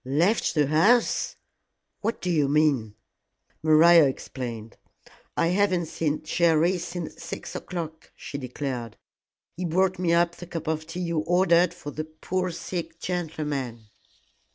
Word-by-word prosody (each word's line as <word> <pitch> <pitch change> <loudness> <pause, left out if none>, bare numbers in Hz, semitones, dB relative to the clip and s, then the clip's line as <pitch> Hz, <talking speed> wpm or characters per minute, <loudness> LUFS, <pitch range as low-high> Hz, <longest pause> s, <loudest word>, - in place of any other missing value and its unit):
"Left 165 - +1
the 150 -2 +4
house! 195 - +3 0.6
What 225 +2 -2
do 180 - -1
you 150 -4 +2
mean?" 140 -8 +2 0.7
Maria 160 +1 +7
explained. 120 -4 -6 0.6
"I 165 - +3
haven't 185 -2 +2
seen 155 -1 -2
Jerry 170 +2 +2
since 170 -1 -6
six - - -7
o'clock," 160 -3 -6
she 140 - -7
declared; 125 -3 -5 0.6
"he 180 - -5
brought 185 +2 +1
me 175 -2 +1
up 170 0 +2
the 175 - -9
cup 165 -2 -5
of 160 0 -2
tea 175 +2 -5
you 170 -2 -1
ordered 175 +1 +3
for 145 -4 -7
the 155 +2 -4
poor 180 +4 -3
sick 165 -1 -5
gentleman." 145 - -4
165 Hz, 135 wpm, -26 LUFS, 150-175 Hz, 0.7 s, Maria